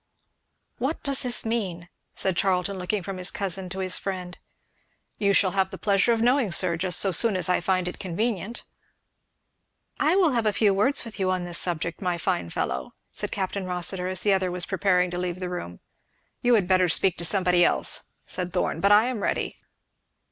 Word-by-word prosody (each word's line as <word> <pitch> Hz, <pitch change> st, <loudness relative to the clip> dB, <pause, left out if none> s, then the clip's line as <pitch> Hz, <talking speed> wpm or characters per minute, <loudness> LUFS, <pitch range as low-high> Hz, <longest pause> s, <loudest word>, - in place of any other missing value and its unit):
"What 270 Hz, +6 st, -3 dB
does 275 Hz, -2 st, +2 dB
this 245 Hz, -2 st, +3 dB
mean?" 190 Hz, -7 st, -3 dB, 0.3 s
said 190 Hz, -2 st, 0 dB
Charlton 185 Hz, +1 st, 0 dB
looking 185 Hz, +2 st, -2 dB
from 195 Hz, +1 st, -6 dB
his 180 Hz, +1 st, 0 dB
cousin 190 Hz, -1 st, -3 dB
to 190 Hz, -, -7 dB
his 185 Hz, -1 st, +1 dB
friend. 180 Hz, -2 st, -5 dB, 0.8 s
"You 200 Hz, -1 st, +2 dB
shall 195 Hz, -1 st, +3 dB
have 190 Hz, 0 st, 0 dB
the -, -, -8 dB
pleasure 200 Hz, +2 st, +2 dB
of 230 Hz, -1 st, +1 dB
knowing, 245 Hz, -4 st, +2 dB
sir, 170 Hz, -1 st, +3 dB
just 180 Hz, +2 st, +3 dB
so 195 Hz, -, +3 dB
soon 210 Hz, +2 st, +3 dB
as 180 Hz, -, +1 dB
I 180 Hz, -, +2 dB
find 185 Hz, 0 st, 0 dB
it 180 Hz, -, -6 dB
convenient." 210 Hz, +4 st, -3 dB, 1.4 s
"I 315 Hz, +4 st, +2 dB
will 365 Hz, -6 st, +3 dB
have 230 Hz, -3 st, 0 dB
a 210 Hz, -, +1 dB
few 205 Hz, -2 st, +3 dB
words 255 Hz, +8 st, +2 dB
with 225 Hz, -2 st, -9 dB
you 190 Hz, -1 st, 0 dB
on 185 Hz, -1 st, -1 dB
this 175 Hz, -1 st, 0 dB
subject, 170 Hz, 0 st, -2 dB
my 180 Hz, -2 st, -1 dB
fine 85 Hz, -, -2 dB
fellow," 65 Hz, -5 st, -4 dB, 0.2 s
said -, -, -3 dB
Capt. 190 Hz, -1 st, -3 dB
Rossitur, 180 Hz, -1 st, 0 dB
as 185 Hz, 0 st, -1 dB
the 205 Hz, -, +3 dB
other 190 Hz, -1 st, 0 dB
was 180 Hz, -1 st, -1 dB
preparing 180 Hz, -2 st, +1 dB
to 175 Hz, -, -4 dB
leave 180 Hz, 0 st, -3 dB
the 180 Hz, -1 st, -4 dB
room. 90 Hz, -, -7 dB, 0.6 s
"You 245 Hz, -1 st, +4 dB
had 200 Hz, -5 st, +1 dB
better 185 Hz, -1 st, +3 dB
speak 180 Hz, +2 st, +3 dB
to -, -, -2 dB
somebody 180 Hz, -1 st, +3 dB
else," -, -, +2 dB, 0.2 s
said 180 Hz, -2 st, -3 dB
Thorn. -, -, -1 dB
"But 200 Hz, -, +3 dB
I 210 Hz, +2 st, +6 dB
am 250 Hz, -4 st, -3 dB
ready." -, -, -2 dB
190 Hz, 200 wpm, -25 LUFS, 180-205 Hz, 1.4 s, I